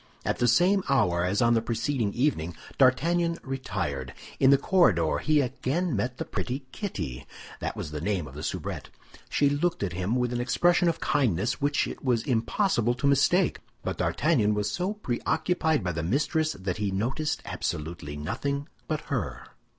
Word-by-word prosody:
At -, -, -1 dB
the 120 Hz, -, +3 dB
same 185 Hz, -, +4 dB
hour 90 Hz, -11 st, +3 dB
as 100 Hz, +6 st, +1 dB
on 120 Hz, 0 st, +4 dB
the 115 Hz, -, +3 dB
preceding 115 Hz, -1 st, -1 dB
evening, 90 Hz, -, 0 dB, 0.2 s
D'Artagnan 165 Hz, +6 st, +3 dB
retired. 75 Hz, -, -4 dB, 0.2 s
In 130 Hz, -, +6 dB
the 140 Hz, -, +7 dB
corridor 120 Hz, -, +3 dB
he 155 Hz, -1 st, +3 dB
again 140 Hz, +5 st, -1 dB
met 120 Hz, +5 st, -2 dB
the -, -, -3 dB
pretty 130 Hz, +2 st, -4 dB
Kitty; 70 Hz, -, -5 dB, 0.3 s
that -, -, -3 dB
was 75 Hz, -, -5 dB
the 75 Hz, -1 st, -4 dB
name 95 Hz, -2 st, -1 dB
of 65 Hz, -, -11 dB
the 75 Hz, -, -7 dB
soubrette. -, -, -4 dB, 0.4 s
She 145 Hz, -, +3 dB
looked 145 Hz, +1 st, 0 dB
at 90 Hz, -4 st, -2 dB
him 95 Hz, +6 st, -1 dB
with 125 Hz, -1 st, 0 dB
an 120 Hz, -, -1 dB
expression 175 Hz, +8 st, +3 dB
of 165 Hz, -, -2 dB
kindness 125 Hz, -, +1 dB
which 145 Hz, +1 st, +2 dB
it -, -, -7 dB
was 120 Hz, -4 st, +1 dB
impossible 120 Hz, -, +1 dB
to 125 Hz, -, -4 dB
mistake; 140 Hz, +7 st, +3 dB, 0.2 s
but -, -, -3 dB
D'Artagnan 105 Hz, 0 st, +2 dB
was 105 Hz, 0 st, -1 dB
so 185 Hz, +3 st, -1 dB
preoccupied 160 Hz, -, 0 dB
by 90 Hz, -, -1 dB
the 80 Hz, -1 st, -3 dB
mistress 150 Hz, -, +1 dB
that 95 Hz, -1 st, -4 dB
he 105 Hz, -1 st, -1 dB
noticed 125 Hz, +11 st, -1 dB
absolutely 75 Hz, -2 st, -4 dB
nothing 140 Hz, -, -3 dB, 0.2 s
but 155 Hz, -1 st, -1 dB
her. 90 Hz, -, -3 dB
125 Hz, 175 wpm, -27 LUFS, 100-150 Hz, 0.4 s, the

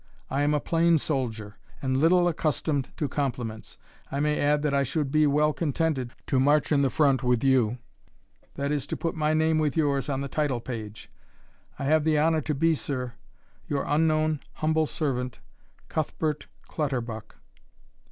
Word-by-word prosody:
I 135 Hz, -, +1 dB
am 145 Hz, +1 st, +2 dB
a -, -, +2 dB
plain 165 Hz, +2 st, +3 dB
soldier, 115 Hz, -8 st, -3 dB, 0.2 s
and 130 Hz, -1 st, 0 dB
little 175 Hz, +4 st, +4 dB
accustomed 155 Hz, -4 st, 0 dB
to 150 Hz, -, -1 dB
compliments. 125 Hz, -6 st, -3 dB, 0.3 s
I 140 Hz, -, -2 dB
may 150 Hz, +1 st, +1 dB
add, 145 Hz, +1 st, +2 dB
that 150 Hz, -2 st, +1 dB
I 140 Hz, -, +3 dB
should 140 Hz, +1 st, -1 dB
be 155 Hz, 0 st, +4 dB
well 150 Hz, +1 st, +3 dB
contented 145 Hz, -5 st, -1 dB
to 135 Hz, -, +1 dB
march 145 Hz, +4 st, +3 dB
in 145 Hz, -2 st, +4 dB
the 135 Hz, -, +3 dB
front 135 Hz, 0 st, +3 dB
with 125 Hz, -2 st, +1 dB
you 125 Hz, -4 st, +3 dB, 0.8 s
that 140 Hz, +1 st, -2 dB
is, 145 Hz, -2 st, -1 dB
to -, -, -3 dB
put 165 Hz, -, -2 dB
my 155 Hz, -1 st, +1 dB
name 160 Hz, 0 st, +2 dB
with 150 Hz, -2 st, 0 dB
yours 140 Hz, -3 st, +1 dB
on 135 Hz, -1 st, -1 dB
the 140 Hz, -, -3 dB
title 140 Hz, -3 st, -1 dB
page. 110 Hz, -3 st, -7 dB, 0.7 s
I -, -, -5 dB
have 155 Hz, +2 st, +3 dB
the 155 Hz, -1 st, +2 dB
honour 160 Hz, +1 st, +3 dB
to 150 Hz, +1 st, -2 dB
be, 165 Hz, +4 st, +3 dB
Sir, 130 Hz, -5 st, -3 dB, 0.5 s
Your 140 Hz, -1 st, -1 dB
unknown 155 Hz, 0 st, +2 dB
humble 155 Hz, 0 st, +1 dB
Servant, 125 Hz, -6 st, -2 dB, 0.5 s
Cuthbert 155 Hz, -1 st, -2 dB, 0.2 s
Clutterbuck. 120 Hz, -7 st, -3 dB
145 Hz, 170 wpm, -27 LUFS, 130-155 Hz, 0.8 s, little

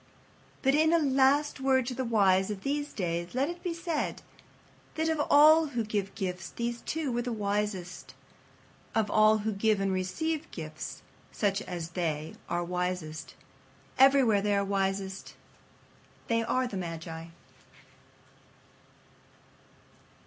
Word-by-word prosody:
But 270 Hz, 0 st, +4 dB
in 315 Hz, +2 st, +4 dB
a -, -, +6 dB
last 280 Hz, 0 st, +2 dB
word 265 Hz, -1 st, +2 dB
to 250 Hz, -, -3 dB
the 260 Hz, +1 st, -2 dB
wise 195 Hz, -5 st, +3 dB
of 200 Hz, -2 st, -5 dB
these 290 Hz, +1 st, -2 dB
days 175 Hz, 0 st, -3 dB
let 275 Hz, +4 st, +1 dB
it 345 Hz, -, -10 dB
be 355 Hz, -, -2 dB
said 335 Hz, -2 st, -3 dB, 0.7 s
that 320 Hz, 0 st, 0 dB
of 320 Hz, -2 st, +1 dB
all 310 Hz, +2 st, +7 dB
who 240 Hz, -5 st, -2 dB
give 205 Hz, -2 st, -3 dB
gifts 185 Hz, -3 st, -4 dB
these 235 Hz, 0 st, -4 dB
two 310 Hz, -4 st, -2 dB
were 240 Hz, 0 st, 0 dB
the 245 Hz, 0 st, -3 dB
wisest. 205 Hz, -4 st, -3 dB, 0.8 s
Of 220 Hz, -2 st, +1 dB
all 215 Hz, 0 st, +5 dB
who 220 Hz, -, +1 dB
give 210 Hz, +1 st, +1 dB
and 195 Hz, -1 st, 0 dB
receive 305 Hz, -, -2 dB
gifts, 155 Hz, -2 st, -7 dB, 0.3 s
such 200 Hz, -1 st, 0 dB
as 170 Hz, -2 st, -5 dB
they 160 Hz, -3 st, -2 dB, 0.2 s
are 175 Hz, 0 st, 0 dB
wisest. 180 Hz, -3 st, -4 dB, 0.6 s
Everywhere 265 Hz, -6 st, +6 dB
they 205 Hz, 0 st, +1 dB
are 200 Hz, 0 st, +1 dB
wisest. 195 Hz, -1 st, -2 dB, 0.9 s
They 230 Hz, 0 st, +2 dB
are 255 Hz, +3 st, 0 dB
the 215 Hz, -6 st, -4 dB
magi. 165 Hz, -2 st, -6 dB
215 Hz, 135 wpm, -29 LUFS, 185-270 Hz, 0.9 s, all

